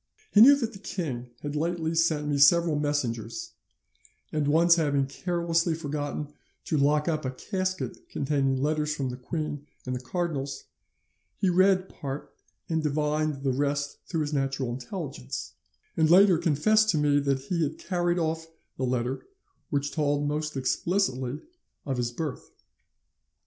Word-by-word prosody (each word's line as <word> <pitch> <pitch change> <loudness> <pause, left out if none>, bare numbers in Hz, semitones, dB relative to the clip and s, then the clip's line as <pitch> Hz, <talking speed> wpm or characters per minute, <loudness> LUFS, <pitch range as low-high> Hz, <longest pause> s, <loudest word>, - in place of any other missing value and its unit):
He 210 - +7
knew 280 +5 +10
that 235 -4 -3
the 195 - -10
king 135 -12 -4
had 145 0 -3
lately 165 +1 -1
sent 160 -2 +2
me 145 -1 0
several 165 +2 +6
messengers, 145 - -2 0.8
and 150 -2 0
once 165 +3 +5
having 145 -5 +2
carelessly 170 +2 0
forgotten 145 -1 -4 0.3
to 155 - 0
lock 150 +2 +3
up 155 -2 0
a 130 - -1
casket 185 +7 -4
containing 135 -2 0
letters 150 +1 0
from 135 -3 -2
the 125 - -4
queen 145 +2 -4 0.2
and 125 0 -2
the - - -3
cardinals, 135 -1 -3 0.7
he 190 - +2
read 185 +1 +4
part 140 -3 -7 0.3
and 160 -1 0
divined 150 -1 0
the 135 -2 +1
rest 140 +1 -1
through 165 -3 -1
his 150 0 -2
natural 135 -3 -1
intelligence; 130 - -6 0.4
and 160 -1 +3
later 185 -1 +7
confessed 215 +7 +3
to 165 - +3
me 145 -1 +3
that 140 -1 +1
he 165 +6 -2
had 155 0 -1
carried 175 -1 0
off 160 -1 -1 0.3
the 130 - 0
letter 125 +1 -2 0.4
which 145 -1 -1
told 145 -2 0
most 150 0 -2
explicitly 135 -2 0 0.4
of 135 -2 -2
his 120 -1 -1
birth. 145 +2 -5
150 Hz, 150 wpm, -27 LUFS, 140-170 Hz, 0.8 s, knew